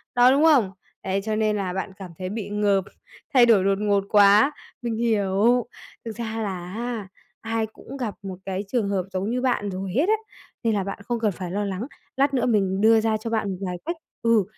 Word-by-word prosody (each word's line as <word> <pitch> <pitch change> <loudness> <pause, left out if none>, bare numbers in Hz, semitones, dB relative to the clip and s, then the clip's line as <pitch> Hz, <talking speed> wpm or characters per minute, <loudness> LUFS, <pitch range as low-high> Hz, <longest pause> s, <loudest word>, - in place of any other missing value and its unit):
đó, 245 +1 +7
đúng 285 +3 +3
không? 265 -12 +5 0.3
Đấy 195 +1 -1
cho 215 -1 0
nên 215 -1 +1
là 185 -3 -2
bạn 190 +1 -3
cảm 185 -3 -9
thấy 185 0 -3
bị 210 -1 -4
ngợp, 205 -2 +2 0.5
thay 245 -2 +7
đổi 220 -5 +5
đột 195 0 +2
ngột 200 -2 +2
quá. 205 +6 +6 0.3
Mình 235 -2 -2
hiểu, 220 +1 +2 0.4
thực 225 - -5
ra 225 -1 -3
là 185 -3 -4
á, 230 -3 -4 0.3
ai 225 0 -1
cũng 235 +5 -11
gặp 235 -6 -3
một 190 -1 -5
cái 190 0 -2
trường 215 -3 0
hợp 190 -2 0
giống 190 +3 -1
như 250 +1 -1
bạn 245 -6 0
rồi 185 0 -4
hết 325 +9 +2
á, 435 - +5 0.5
nên 225 -2 +2
là 195 - 0
bạn 195 +1 -5
không 240 +1 -2
cần 215 -2 +1
phải 180 0 -6
lo 205 +1 -1
lắng, 200 +6 -3 0.3
lát 275 +1 +3
nữa 255 - +1
mình 195 -4 +1
đưa 225 0 +6
ra 220 -1 +1
cho 225 +2 -5
bạn 215 -3 0
một 185 - -4
vài 180 0 -3
cách 340 +2 -2 0.3
ừ, 230 -3 +4
210 Hz, 225 wpm, -24 LUFS, 195-235 Hz, 0.5 s, đó